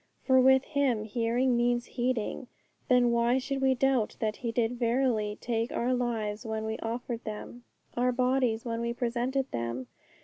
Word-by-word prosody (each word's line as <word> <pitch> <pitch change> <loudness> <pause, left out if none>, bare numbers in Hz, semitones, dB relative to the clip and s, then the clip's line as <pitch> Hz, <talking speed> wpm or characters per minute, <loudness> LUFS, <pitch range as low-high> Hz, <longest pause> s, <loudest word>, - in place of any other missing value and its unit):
For 260 -1 +5
with 265 +1 +5
Him 270 -8 0
hearing 235 +3 +1
means 240 0 +1
heeding. 245 0 -2 0.4
Then 250 -3 +4
why 235 +2 +3
should 270 +1 -2
we 265 -1 +3
doubt 260 -3 +1
that 215 -1 -1
He 235 -2 -3
did 235 +1 -1
verily 230 -4 +1
take 230 0 -2
our 250 +2 0
lives 225 -3 -2
when 220 -1 -3
we 220 0 -3
offered 235 +1 -4
them 230 +2 -7 0.3
our 250 +1 +2
bodies 250 -2 +1
when 230 -1 -2
we 235 0 -1
presented 250 +3 -1
them? 120 +2 -3
240 Hz, 165 wpm, -29 LUFS, 225-255 Hz, 0.4 s, For